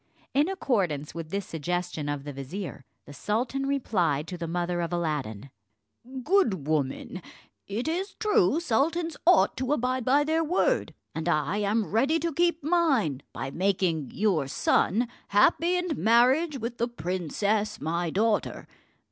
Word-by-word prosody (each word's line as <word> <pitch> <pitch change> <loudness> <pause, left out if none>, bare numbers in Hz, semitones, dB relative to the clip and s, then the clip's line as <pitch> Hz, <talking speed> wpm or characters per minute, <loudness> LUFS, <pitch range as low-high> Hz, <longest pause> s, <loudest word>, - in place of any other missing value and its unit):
In 290 +6 +3
accordance 190 - -1
with 165 -1 -6
this 200 +2 -3
suggestion 170 -1 -3
of 145 -1 -3
the 145 0 -6
vizier, 140 +3 -6 0.2
the 145 - -11
sultan 245 - -2
replied 180 - 0
to 180 - -5
the 170 - -3
mother 175 +1 -1
of 170 - -3
Aladdin: 145 -9 -3 0.7
"Good 235 - +2
woman, 155 +4 -2 0.5
it 220 +7 -3
is 365 +5 -2
true 415 -7 +2
sultans 325 +4 0
ought 360 -1 +5
to 260 +2 0
abide 255 -2 0
by 275 +4 +3
their 320 +2 +1
word, 370 +10 +1 0.2
and 160 +1 -2
I 155 +3 +1
am 210 +1 +1
ready 270 +9 +3
to 330 0 -2
keep 340 -1 +1
mine, 275 - +2
by 135 - -5
making 180 -4 0
your 190 -9 +1
son 220 - +1 0.2
happy 335 - +3
in 360 -1 -2
marriage 260 +7 +4
with 235 0 -5
the 235 - +1
princess 205 +2 -2
my 170 +2 -1
daughter. 210 +5 0
210 Hz, 150 wpm, -27 LUFS, -, 0.7 s, ought